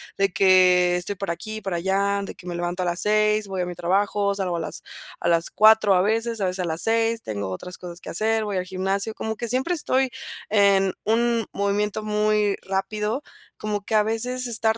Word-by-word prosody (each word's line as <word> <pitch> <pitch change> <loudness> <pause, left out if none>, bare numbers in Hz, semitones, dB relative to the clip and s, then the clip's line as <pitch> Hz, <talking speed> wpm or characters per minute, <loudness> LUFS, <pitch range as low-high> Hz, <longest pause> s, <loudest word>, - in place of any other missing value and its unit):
de 195 -1 +1
que, 180 -2 +5
estoy 180 +3 -3
por 195 -2 -3
aquí, 215 +6 -5
por 195 -3 -4
allá, 195 +3 0
de - - -7
que 180 - -15
me 175 - -4
levanto 175 +1 -2
a - - -2
las 175 0 -1
6:00, 215 0 +2
voy 190 -1 -3
a - - -1
mi 180 - -5
trabajo, 200 +3 0
salgo 185 -3 -2
a - - -3
las 165 - -5 0.4
a - - -2
las 170 -1 +2
4:00 215 -2 +5
a 180 - +4
veces 225 +2 0
a 195 - 0
veces 185 +1 -2
a 180 - -1
las 165 0 -2
6:00, 225 0 +1
tengo 100 -3 -4
otras 180 - -7
cosas 175 -1 -9
que - - -8
hacer, 220 +4 +1
voy 205 -2 -2
al 180 - -2
gimnasio, 195 +3 -2
como 220 0 -3
que 235 - -4
siempre 260 +9 0
estoy, 265 -5 +1 0.4
en 200 -2 +4
un, 230 0 +1
movimiento 205 +1 -1
muy 210 -1 +1
rápido, 210 +6 -2 0.3
como 210 -1 -3
que 220 - -2
a 210 - +5
veces 245 +4 -1
estar 225 -1 +1
200 Hz, 215 wpm, -24 LUFS, 180-220 Hz, 0.4 s, que